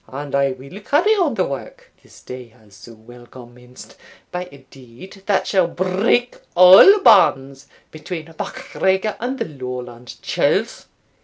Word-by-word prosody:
And 140 +1 -9
I 140 0 +1
will 135 +9 -13
carry 300 - +1
on 350 - 0
the 185 - 0
work, 140 - -9
this - - -20
day 125 -1 -10
has 110 -2 -24
so 115 +4 -15
well 120 +2 -17
commenced, 125 0 -16 0.3
by 180 0 -6
a 140 -1 -17
deed 135 - -15
that 205 - 0
shall 185 -4 +1
break 190 +8 -1 0.2
all 185 - +8
bands 135 - +3 0.2
between 160 +1 -8
MacGregor 210 -5 -3
and 255 +3 -4
the - - -3
Lowland 125 -4 -9
churls. - - -2
145 Hz, 145 wpm, -19 LUFS, 125-195 Hz, 0.3 s, all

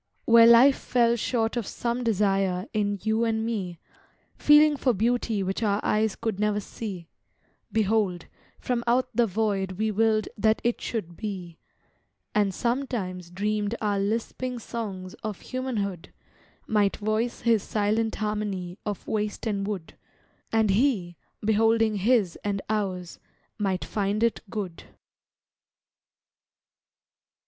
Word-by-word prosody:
Where 230 0 +8
life 245 +4 +7
fell 235 -1 +2
short 230 0 0
of 235 -4 -2
some 240 +1 -2
desire 195 -4 +1
In 205 -2 0
you 220 +1 +1
and 225 -1 0
me, 195 -7 -3 0.6
Feeling 295 0 +6
for 255 -4 +1
beauty 225 -1 0
which 190 +3 -2
our 205 -2 +1
eyes 215 -1 +1
Could 220 -4 -3
never 210 0 +1
see, 195 -4 -7 0.6
Behold, 210 -5 +1 0.3
from 245 -2 -1
out 250 +2 +2
the 240 -1 +4
void 195 -2 -1
we 215 +3 -1
willed 215 0 +2
That 220 +1 +2
it 240 0 0
should 175 -7 -4
be, 185 -6 -6 0.7
And 205 -2 +2
sometimes 220 -7 -2
dreamed 210 +3 -1
our 205 -2 0
lisping 230 +5 -2
songs 200 -6 -6
Of 215 -4 -4
humanhood 215 -9 -3 0.6
Might 205 -2 +2
voice 215 +3 -1
his 230 -3 +3
silent 215 +2 0
harmony 210 -4 -3
Of 205 -3 -5
waste 210 -1 -2
and 200 -3 -1
wood, 195 -6 -5 0.6
And 220 -2 +3
he, 195 -6 +1 0.3
beholding 220 0 +3
his 210 -3 +2
and 200 -1 -1
ours, 185 -5 -2 0.4
Might 190 -3 -1
find 205 +1 -1
it 230 - +1
good. 190 -6 -5
215 Hz, 125 wpm, -26 LUFS, 195-230 Hz, 0.7 s, Where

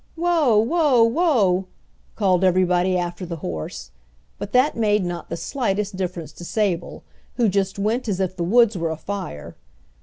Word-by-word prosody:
"Whoa! 330 -9 +2
whoa! 265 +1 +3
whoa!" 230 - +2 0.5
called 190 -3 +2
everybody 185 0 +2
after 175 +1 -4
the 170 -1 -5
horse, 80 - -6 0.5
but 205 - -6
that 255 +4 +3
made 210 -4 +1
not 175 -1 -5
the 170 - -4
slightest 210 - -2
difference 180 -3 -4
to - - -12
Sable, 190 -2 -2 0.3
who 240 -3 +2
just 195 -1 0
went 220 +5 -1
as 195 -3 -1
if 185 -1 -1
the 175 - -3
woods 225 +4 +4
were 165 -2 -2
afire. 160 - -6
195 Hz, 155 wpm, -22 LUFS, 180-230 Hz, 0.5 s, woods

